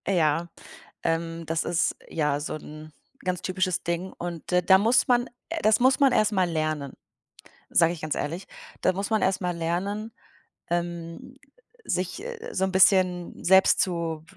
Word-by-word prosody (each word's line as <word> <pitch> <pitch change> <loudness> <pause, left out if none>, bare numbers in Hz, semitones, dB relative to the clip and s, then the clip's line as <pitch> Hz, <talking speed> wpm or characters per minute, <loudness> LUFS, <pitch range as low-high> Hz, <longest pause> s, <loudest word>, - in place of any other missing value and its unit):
Ja, 170 -3 +2 0.6
ähm, 165 0 -2
das 165 0 -1
ist, 170 -1 0
ja, 150 -3 0
so 150 - -4
'n 155 0 -10 0.3
ganz 180 -1 -2
typisches 185 -1 -1
Ding 170 +2 -3
und 170 -2 -6
d 180 0 +4
da 190 +2 +6
muss 225 +6 +3
man 245 -1 +2 0.3
das 215 0 +4
muss 260 +3 +4
man 275 -2 +5
erst 215 -3 +3
mal 185 -3 +2
lernen, 155 -4 -2 0.8
sage 165 0 +4
ich 165 - -9
ganz 155 -1 -2
ehrlich. 170 +6 -4 0.4
Da - - +3
muss 195 +2 -3
man 220 -1 +1
erst 190 +1 +1
mal 180 -1 -1
lernen, 195 +7 -3 0.6
ähm, 170 +6 -4 0.5
sich 185 - -3 0.3
so 190 - -1
'n 190 - -2
bisschen 185 -2 +3
selbst 190 +1 +5
zu, 165 -3 -2
175 Hz, 160 wpm, -26 LUFS, 165-190 Hz, 0.8 s, da